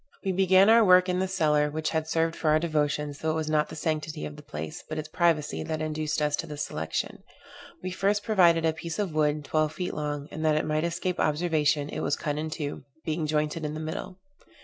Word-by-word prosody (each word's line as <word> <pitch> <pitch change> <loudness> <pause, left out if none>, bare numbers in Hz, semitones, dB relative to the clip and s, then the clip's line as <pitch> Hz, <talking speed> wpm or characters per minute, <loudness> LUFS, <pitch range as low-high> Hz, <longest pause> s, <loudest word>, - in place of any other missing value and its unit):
We 190 - +2
began 190 +1 +5
our 225 +1 +7
work 185 -1 +6
in 180 0 +1
the 190 - 0
cellar 150 -5 +2
which 155 +1 -2
had 160 -1 -1
served 165 +1 +1
for 155 - 0
our 155 - +5
devotions, 150 -2 -1
though 160 - -1
it 155 - +1
was 155 -1 -2
not 150 -1 +2
the - - -8
sanctity 155 - -2
of 75 -1 -7
the - - -11
place, 75 +1 -7
but 155 - -4
its 155 0 -4
privacy, 160 -2 +1
that 160 -1 -3
induced 155 -1 -1
us 150 0 +2
to 165 - -4
this 150 -1 -4
selection. 80 +1 -4 0.6
We 185 - -3
first 200 +2 +1
provided 170 -6 +4
a 160 - +2
piece 165 0 -6
of 200 -6 -2
wood, 150 -1 +1
twelve 155 +1 +1
feet 180 - -3
long, 145 -1 -3
and, 155 - -5
that 155 -1 +3
it 155 - +1
might 155 +1 0
escape 180 +1 -2
observation, 150 -2 +1
it - - -4
was - - 0
cut 150 0 -3
in 155 +1 -3
two, 150 -4 -5 0.2
being 155 0 -1
jointed 150 +1 -1
in 150 0 -3
the - - -4
middle. 160 +3 -5
155 Hz, 235 wpm, -27 LUFS, 150-170 Hz, 0.6 s, our